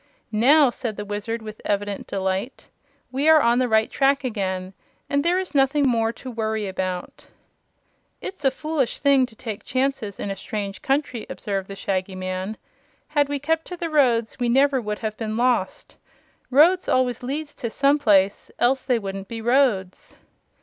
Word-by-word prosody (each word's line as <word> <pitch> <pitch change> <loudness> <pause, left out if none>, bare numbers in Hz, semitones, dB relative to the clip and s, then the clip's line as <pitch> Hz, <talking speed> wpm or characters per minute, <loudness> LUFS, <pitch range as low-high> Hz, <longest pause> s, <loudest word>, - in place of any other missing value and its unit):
"Now," 265 +5 +5
said 235 -4 -5
the 205 - -5
Wizard, 210 +3 -4
with 215 0 -9
evident 205 -1 -2
delight, 190 +5 -3 0.4
"we 275 +4 +2
are 315 -1 +8
on 235 -2 +3
the 255 - +2
right 220 -1 +3
track 275 0 +2
again, 190 -6 -3 0.3
and 285 0 +1
there 345 +2 +2
is 375 -2 -3
nothing 275 +1 +3
more 230 -2 +2
to 255 +2 -9
worry 220 -2 -2
about." 185 -1 -4 0.9
"It's 380 -6 -8
a 270 - +5
foolish 285 -2 -2
thing 275 -2 +4
to 225 - -18
take 220 -3 -6
chances 255 -6 -2
in 200 - -3
a - - -3
strange 200 -1 -5
country," 270 -4 -1
observed 195 -2 -3
the 195 - -7
Shaggy 190 -1 -2
Man. 185 +3 -4 0.5
"Had 290 -2 +2
we 285 - -1
kept 320 +3 -1
to 360 - -7
the 335 -1 -4
roads 245 -6 +2
we 245 -1 +1
never 270 +1 +3
would 210 -1 -3
have 215 0 -3
been 220 -1 -3
lost. 245 0 0 0.5
Roads 335 +8 +5
always 250 -2 +1
lead 280 +5 -3
to 240 -5 -5
some 280 +5 +2
place, 200 -6 +3
else 260 +2 +2
they 250 -2 +1
wouldn't 195 -2 -5
be 230 +2 -6
roads." 225 -6 +1
235 Hz, 175 wpm, -23 LUFS, 205-275 Hz, 0.9 s, are